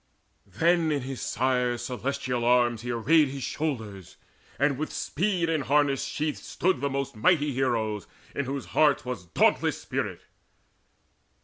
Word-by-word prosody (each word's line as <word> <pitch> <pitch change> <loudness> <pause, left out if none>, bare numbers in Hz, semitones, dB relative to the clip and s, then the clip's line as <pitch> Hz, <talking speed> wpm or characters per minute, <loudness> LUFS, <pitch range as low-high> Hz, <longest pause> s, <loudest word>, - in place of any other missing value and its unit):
Then 165 - +2
in 145 -3 -1
his 130 0 -5
sire's 125 -2 0
celestial 125 -1 -2
arms 120 -1 +3
he 120 - -6
arrayed 145 +7 +4
His 135 0 -6
shoulders; 110 - -4 0.4
and 140 -2 +1
with 155 - -3
speed 180 0 -1
in 160 -2 +1
harness 140 -1 +2
sheathed 150 0 -2
Stood 175 -8 -1
the 140 - 0
most 140 -1 -3
mighty 150 +4 +2
heroes, 115 -6 -1 0.3
in 140 - -2
whose 135 +1 -4
healers 145 -5 +3
Was 115 -8 -5
dauntless - - +2
spirit. - - -3
135 Hz, 140 wpm, -27 LUFS, 120-150 Hz, 0.4 s, arrayed